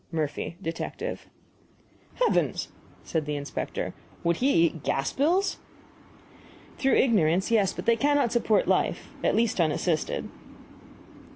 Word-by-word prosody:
MURPHY, 155 0 -3
Detective. 165 0 -5 0.9
"Heavens!" - - +1 0.3
said 155 -3 -2
the 150 - -1
inspector; 145 0 -4 0.3
"would 170 0 +2
he 270 +3 +2
eat 160 -2 -2
gas 135 0 -1
bills?" 345 +8 +1 1.2
"Through 270 -1 +3
ignorance 190 -5 +3
yes; 205 -5 +3
but - - -7
they 230 0 +4
cannot 285 -2 +2
support 230 -3 +2
life. - - 0
At - - +2
least, 225 -5 +2
unassisted." 160 0 0
190 Hz, 115 wpm, -27 LUFS, 160-245 Hz, 1.2 s, they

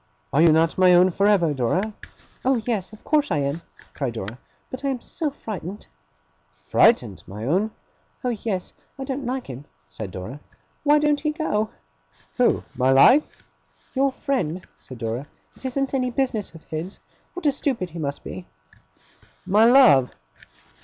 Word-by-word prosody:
'Are 145 - +4
you 170 - +7
not 160 +3 +2
my 180 -1 +7
own 180 +1 +5
for 200 +4 +2
ever, 175 -7 +3
Dora?' 180 - 0 0.5
'Oh 260 -1 +2
yes, 215 -6 -2
of 215 - -15
course 300 -1 +2
I 170 - +1
am!' 140 +3 -1 0.3
cried 135 -5 -3
Dora, 110 +2 -6 0.3
'but 260 +2 -6
I - - 0
am 260 -2 -2
so 315 +5 -3
frightened!' 205 - -7 0.9
'Frightened, - - +4
my 105 +4 -7
own?' 190 - +1 0.5
'Oh 250 - 0
yes! 205 -4 -3 0.2
I 270 - -5
don't 265 -1 -4
like 255 +1 -2
him,' 130 +2 -9 0.2
said 85 +7 -6
Dora. 95 +10 -7 0.4
'Why 295 0 +5
don't 295 -1 +2
he 305 - 0
go?' 260 -9 -1 0.7
'Who, 250 - +3
my 130 0 +1
life?' 250 - +5 0.5
'Your 275 +1 +2
friend,' 185 - -2
said 130 - -11
Dora. 115 +4 -4 0.3
'It - - -13
isn't 270 +1 -1
any 255 -2 +1
business 240 -7 -2
of 165 - -13
his. 165 +5 -6 0.4
What 360 -2 -7
a 290 - +5
stupid 255 - -2
he 170 - -7
must 140 -2 -4
be!' 185 - -8 1.0
'My 205 +4 +5
love! 235 - +6
200 Hz, 165 wpm, -23 LUFS, -, 1.0 s, you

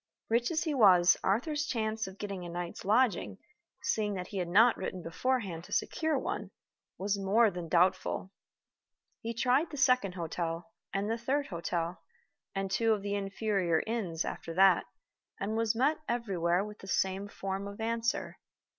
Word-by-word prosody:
Rich 235 +2 +2
as 330 -1 0
he 315 -3 -1
was, 185 -8 +6
Arthur's 295 - 0
chance 220 -4 -1
of 190 +1 -10
getting 195 -3 -5
a 175 - -6
night's 175 0 -5
lodging 215 -2 +2 0.5
(seeing 210 -2 0
that 180 -1 -5
he 200 - -5
had 180 -2 -1
not 220 +7 +6
written 185 -2 -5
beforehand 185 -1 -1
to - - -15
secure 315 -2 0
one) 380 +9 -3 0.5
was 200 +1 -1
more 210 +3 +4
than 175 -2 -6
doubtful. 185 +2 +2 0.9
He 230 +1 -4
tried 255 +7 +2
the 295 - -7
second 250 -8 +3
hotel, 170 +2 -3 0.2
and 195 +1 -1
the 225 +1 -1
third 275 +5 0
hotel, 170 -1 -3 0.5
and 195 0 -2
two 225 +3 +3
of 205 -2 -3
the 200 0 -2
inferior 195 -4 0
inns 195 -8 -2
after 165 - -5
that, 190 0 +5 0.5
and 210 +3 -2
was 225 0 +1
met 275 +7 +2
everywhere 190 -6 +1
with 210 0 -10
the 195 - -11
same 190 +1 0
form 195 0 -4
of 200 +1 -9
answer. 230 +1 -1
200 Hz, 165 wpm, -31 LUFS, 185-230 Hz, 0.9 s, was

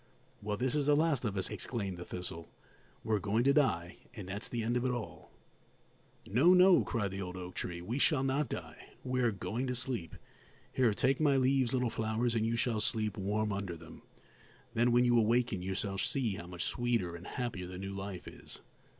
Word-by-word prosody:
"Well, 105 0 -2
this 125 +2 0
is 145 -2 +1
the 145 - +5
last 150 -5 +2
of 100 -3 -2
us!" 95 - 0
exclaimed 100 -2 -3
the 90 - -7
thistle; 85 -2 -6 0.5
"we're 110 -2 +1
going 105 +4 +1
to 140 +1 +4
die, 90 - +1 0.2
and 105 -5 -7
that's 100 +4 -4
the 115 -2 -2
end 120 +2 0
of 125 - +1
it 130 - +1
all!" 120 -3 -5 1.0
"No, 145 - +5
no," 185 0 +7
cried 105 -5 -2
the 95 +1 -4
old 90 0 -5
oak 90 0 -7
tree; 85 -1 -4
"we 115 +9 -2
shall 145 -2 +3
not 135 +3 0
die; 80 -2 -8
we 125 0 0
are 120 - +4
going 115 +5 -3
to 125 - -1
sleep. 125 - -2 0.6
Here, 120 -5 +3
take 135 +4 +2
my 145 -3 +4
leaves, 130 -2 +3
little 125 -3 +1
flowers, 115 +2 0
and 110 -1 +1
you 115 - 0
shall 115 -2 +1
sleep 110 -2 0
warm 105 +2 -1
under 100 -4 -4
them. 80 0 -13 0.7
Then, 120 +1 +3
when 120 +1 +5
you 120 -1 +5
awaken, 115 -2 +2
you 95 +1 -3
shall 95 0 -2
see 120 -3 0
how 85 -2 -7
much 90 -1 -4
sweeter 115 -8 0
and 85 +1 -9
happier 115 -8 -4
the 90 0 -7
new 100 +1 -5
life 95 -2 -6
is." - - -10
110 Hz, 210 wpm, -33 LUFS, 95-125 Hz, 1.0 s, no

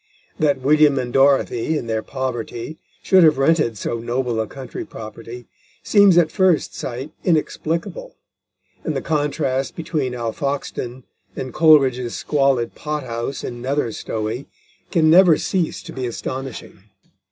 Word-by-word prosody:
That 145 -3 +2
William 150 +1 +4
and 125 -2 -3
Dorothy, 135 +1 +2
in 125 - -4
their 110 -1 -1
poverty, 130 +2 -5 0.2
should 190 -2 +5
have 155 -3 +5
rented 135 -5 +2
so 115 +4 -3
noble 120 -1 -1
a 110 - -3
country 130 +1 -7
property 115 +2 -9 0.4
seems 200 -4 +5
at 165 -3 +4
first 185 -5 +2
sight 130 +4 -6
inexplicable, 170 - -1 0.7
and - - -2
the - - -1
contrast 145 -3 -1
between 150 -6 -2
Alfoxden 125 +1 -4 0.3
and 130 -2 -5
Coleridge's 135 -7 +4
squalid 135 -5 +1
pot 150 -1 -4
house 120 +2 -4
in 120 -1 -6
Nether 135 -1 -1
Stowey 110 +4 -4 0.4
can 160 -3 +3
never 175 -2 +7
cease 180 -4 -2
to - - -9
be 130 -1 -3
astonishing. 130 -2 -6
135 Hz, 135 wpm, -21 LUFS, 120-155 Hz, 0.7 s, never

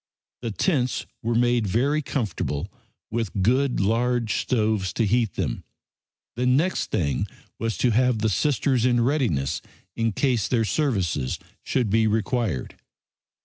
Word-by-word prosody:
The 120 - -3
tents 125 - 0 0.2
were 115 +1 -1
made 120 -2 +2
very 135 +10 +1
comfortable, 110 - -2 0.4
with 110 -4 -1
good 130 +5 +2
large 115 +2 +1
stoves 110 -5 0
to 115 - +1
heat 115 +1 +1
them. 75 -11 -2 0.7
The 125 +2 0
next 150 +9 +2
thing 70 -7 0 0.3
was 115 -1 -2
to 125 - +2
have 125 +1 +3
the 110 +1 +1
Sisters 130 +2 +1
in 120 -1 +3
readiness 85 - 0 0.3
in 115 -1 +1
case 125 -1 +1
their 115 -3 +1
services 95 - 0 0.2
should 120 -6 0
be 110 +1 +4
required. 110 - -1
115 Hz, 135 wpm, -24 LUFS, 105-125 Hz, 0.7 s, be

